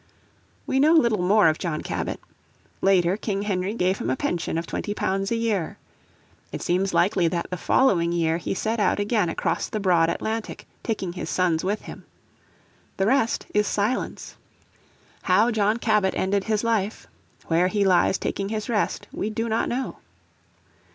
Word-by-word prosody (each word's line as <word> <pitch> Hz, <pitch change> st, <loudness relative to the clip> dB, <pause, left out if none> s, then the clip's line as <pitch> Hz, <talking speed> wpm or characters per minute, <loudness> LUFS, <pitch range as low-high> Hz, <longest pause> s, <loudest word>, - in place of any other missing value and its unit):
We 265 Hz, -, 0 dB
know 305 Hz, +4 st, +5 dB
little 235 Hz, -, +3 dB
more 200 Hz, +2 st, +4 dB
of 155 Hz, 0 st, +1 dB
John 165 Hz, -4 st, -2 dB
Cabot. -, -, -3 dB, 0.6 s
Later 185 Hz, -2 st, +3 dB
King 200 Hz, -2 st, -2 dB
Henry 195 Hz, 0 st, -1 dB
gave 185 Hz, -2 st, +1 dB
him -, -, -3 dB
a 130 Hz, -, +1 dB
pension 170 Hz, +3 st, -2 dB
of 165 Hz, -, -2 dB
£20 195 Hz, -1 st, -2 dB
a 230 Hz, -, 0 dB
year. 220 Hz, -7 st, -1 dB, 0.7 s
It -, -, -5 dB
seems 190 Hz, +2 st, +1 dB
likely 180 Hz, -1 st, +3 dB
that 170 Hz, +1 st, -3 dB
the -, -, -1 dB
following 175 Hz, -3 st, +2 dB
year 165 Hz, -1 st, +1 dB
he 175 Hz, -, -3 dB
set 220 Hz, +4 st, -1 dB
out 205 Hz, -, +2 dB
again 205 Hz, -3 st, +1 dB
across -, -, -2 dB
the 215 Hz, -, -3 dB
broad 175 Hz, -4 st, +3 dB
Atlantic, 220 Hz, +5 st, -4 dB, 0.2 s
taking 195 Hz, -6 st, -3 dB
his 180 Hz, -, -5 dB
sons 175 Hz, -3 st, +1 dB
with 205 Hz, +3 st, -1 dB
him. -, -, -10 dB, 0.9 s
"The 195 Hz, -, +1 dB
rest 235 Hz, 0 st, +1 dB
is 210 Hz, 0 st, +2 dB
silence." 210 Hz, +5 st, -2 dB, 0.8 s
How 210 Hz, +6 st, +3 dB
John 215 Hz, 0 st, +1 dB
Cabot 210 Hz, -5 st, +1 dB
ended 195 Hz, +1 st, 0 dB
his 215 Hz, -1 st, 0 dB
life, 220 Hz, -2 st, -1 dB, 0.4 s
where 170 Hz, +2 st, +2 dB
he 200 Hz, +1 st, +1 dB
lies 185 Hz, 0 st, +3 dB
taking 195 Hz, 0 st, -3 dB
his 215 Hz, 0 st, -4 dB
rest, 215 Hz, -3 st, -1 dB
we 210 Hz, -, -3 dB
do 225 Hz, +1 st, -2 dB
not 220 Hz, 0 st, 0 dB
know. 255 Hz, +2 st, -3 dB
200 Hz, 165 wpm, -24 LUFS, 180-220 Hz, 0.9 s, know